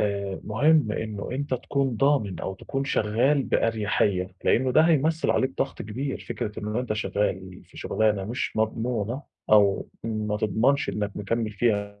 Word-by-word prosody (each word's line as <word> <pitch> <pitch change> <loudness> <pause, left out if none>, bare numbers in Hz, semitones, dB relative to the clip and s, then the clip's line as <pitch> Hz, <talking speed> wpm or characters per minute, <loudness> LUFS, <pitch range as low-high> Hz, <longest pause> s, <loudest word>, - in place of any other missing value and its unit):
آآ 100 -2 -1
مهم 125 +2 +3
إنه 105 -2 -4
أنت 140 +1 -2
تكون 135 -1 -1
ضامن 135 -9 +2
أو 95 - -4
تكون 135 +8 -4
شغّال 130 +4 +2
بأريحيّة، 105 -6 0
لإنه 130 +1 +3
ده - - +6
هيمثّل 160 0 +2
عليك 130 - +2
ضغْط 135 - -1
كبير، 130 +7 -4
فكرة 110 -3 -4
إنه 105 +3 -2
أنت 125 -4 -2
شغّال 95 -3 -2
في - - -20
شُغلانة 105 -3 0
مش 120 +2 -3
مضمونة، 115 +3 -1 0.3
أو 100 -2 +4 0.2
ما 110 -2 -2
تضمَنش 120 +7 +1
إنك 105 -1 -2
مكمِّل 110 +2 -1
فيها 100 -2 -1
110 Hz, 150 wpm, -26 LUFS, 105-130 Hz, 0.3 s, ده